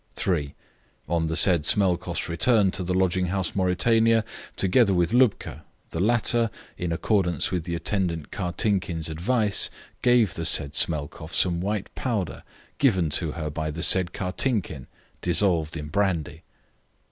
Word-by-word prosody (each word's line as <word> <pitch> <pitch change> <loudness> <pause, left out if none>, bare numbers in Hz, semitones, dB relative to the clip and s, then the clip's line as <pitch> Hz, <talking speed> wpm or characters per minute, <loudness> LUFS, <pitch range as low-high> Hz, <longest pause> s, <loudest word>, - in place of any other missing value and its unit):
3. 75 -7 -2 0.5
On 85 -1 0
the 80 - -2
said 85 -3 +4
Smelkoff's 90 -1 +1
return 100 +4 +4
to 90 - -4
the 90 +1 -2
lodging 95 -1 +1
house 95 0 -2
Mauritania, 110 +4 +2 0.3
together 100 +1 +3
with 90 +4 +1
Lubka, 120 - +1 0.3
the 80 - -4
latter, 115 +2 +2 0.3
in 90 -1 -4
accordance 90 +1 0
with 90 -4 -2
the 85 -1 -3
attendant 85 -2 -2
Kartinkin's 90 -3 -1
advice, 105 +6 0 0.3
gave 120 -7 +3
the 85 - -5
said 70 -3 +1
Smelkoff 75 +1 -2
some 85 -2 +1
white 105 +1 -3
powder 105 -10 -3 0.4
given 95 - +2
to 80 0 -1
her 80 -2 -5
by 80 +1 -3
the 80 +3 -4
said 90 -2 +3
Kartinkin, 90 - -1 0.3
dissolved 85 -3 +1
in 75 -1 -7
brandy. 85 -6 -1
90 Hz, 140 wpm, -25 LUFS, 80-105 Hz, 0.5 s, said